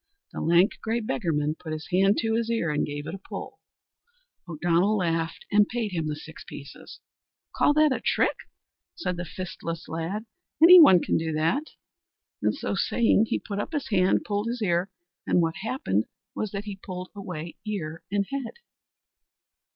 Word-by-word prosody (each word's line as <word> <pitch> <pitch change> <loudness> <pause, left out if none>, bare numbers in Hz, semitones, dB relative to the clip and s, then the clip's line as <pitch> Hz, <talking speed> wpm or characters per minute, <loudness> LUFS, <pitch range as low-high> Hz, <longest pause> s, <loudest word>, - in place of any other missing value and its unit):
The - - -5
lank, 175 +5 +3
grey 225 +1 -1
beggarman 165 - -1
put 160 -2 -6
his 155 0 -6
hand 195 +3 +4
to 225 -1 0
his 230 0 0
ear, 225 -9 0
and 150 - 0
he - - -6
gave 145 0 -5
it 160 - -5
a 195 - -6
pull. - - -8 0.9
O'Donnell 175 +6 +2
laughed 165 -2 -1
and 205 0 +5
paid 230 -3 -2
him 165 -3 -2
the 150 - -2
six 160 +1 -11
pieces. 140 0 -11 0.6
"Call - - +4
that 305 -1 +5
a 260 - -1
trick?" - - +2 0.6
said 180 - -2
the 175 +1 -5
fistless 170 0 -6
lad, 170 +7 -3 0.3
"any 350 +3 +10
one 185 - +8
can - - +1
do 160 0 -2
that," 165 - 0 0.7
and - - +1
so - - -3
saying, 225 -2 +3
he - - 0
put 200 -2 -5
up 210 - -4
his 295 -3 -2
hand, 185 -3 +3
pulled 205 +1 -1
his 235 -1 -2
ear, 175 0 +1 0.4
and - - +3
what 165 -1 +1
happened 195 - -1 0.3
was 215 - -3
that 200 +1 -5
he 205 -2 -6
pulled 185 -1 -7
away 180 -5 -7
ear 170 -7 -4
and 200 0 +1
head. 275 -4 -3
185 Hz, 180 wpm, -26 LUFS, 165-220 Hz, 0.9 s, any